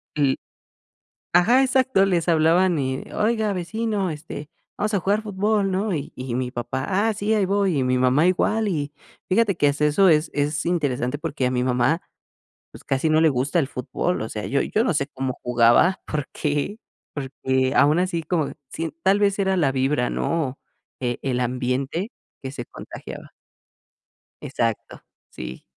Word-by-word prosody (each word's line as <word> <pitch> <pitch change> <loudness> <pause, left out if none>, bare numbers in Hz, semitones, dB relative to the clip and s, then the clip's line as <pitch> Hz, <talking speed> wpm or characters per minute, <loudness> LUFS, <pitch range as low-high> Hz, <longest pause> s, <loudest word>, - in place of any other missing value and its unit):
el 140 -3 +2 0.9
ajá, 240 +9 +5
exacto, 260 -6 +3
les 175 -3 0
hablaban: 170 +2 +4
"Eh, 130 -1 -2
oiga, 220 -1 +1
vecino, 205 +2 -2
este, 150 -1 -8 0.3
vamos 210 +1 -1
a 200 - +3
jugar 200 +4 +1
fútbol", 205 -1 0
¿no? 200 +3 0
Y 145 -2 -5
y 125 -2 -4
mi 125 0 -2
papá: 130 +1 -3
"Ah 205 +4 +2
sí, 205 +2 -1
ahí 210 -3 +2
voy", 195 -5 +1
y - - +1
mi 125 0 +1
mamá 130 +6 +3
igual, 215 +4 +1
y 150 -6 -2 0.4
fíjate 200 0 +3
que 145 - +3
hasta 145 +1 0
eso 170 +6 +4
es 155 0 +3
es 145 +1 0
interesante 145 -6 0
porque 145 -5 -2
a - - -1
mi 125 -1 0
mamá, 125 +6 +1 0.7
pues, - - -13
casi 135 +4 0
no 155 0 +4
le 160 - +5
gusta 140 +5 0
el 140 - 0
fútbol, 140 +7 -2
o 110 - -4
sea, 105 -1 -5
yo 140 +1 +1
yo 220 - +1
no 215 - +1
sé 140 -2 0
cómo 130 -1 -4
jugaba, 120 +10 +4
porque 150 +5 -2 0.4
porque 130 -1 -1
aún 150 +4 +5
así 175 -2 -1
como 160 -2 -1 0.2
sien 165 +3 -4
tal 195 +2 +4
vez 200 -1 +2
era 190 -1 +1
la 150 -6 +2
vibra, 130 -1 +1
¿no? 150 -6 -2 0.4
E 120 -2 -2
el 130 -2 0
ambiente 130 - -2 0.3
que 135 -2 -5
se 125 -3 -6
contagiaba. - - -10 1.1
Exacto, 115 -2 -3 0.3
sí. 65 +1 -8
155 Hz, 170 wpm, -23 LUFS, 130-190 Hz, 1.1 s, ajá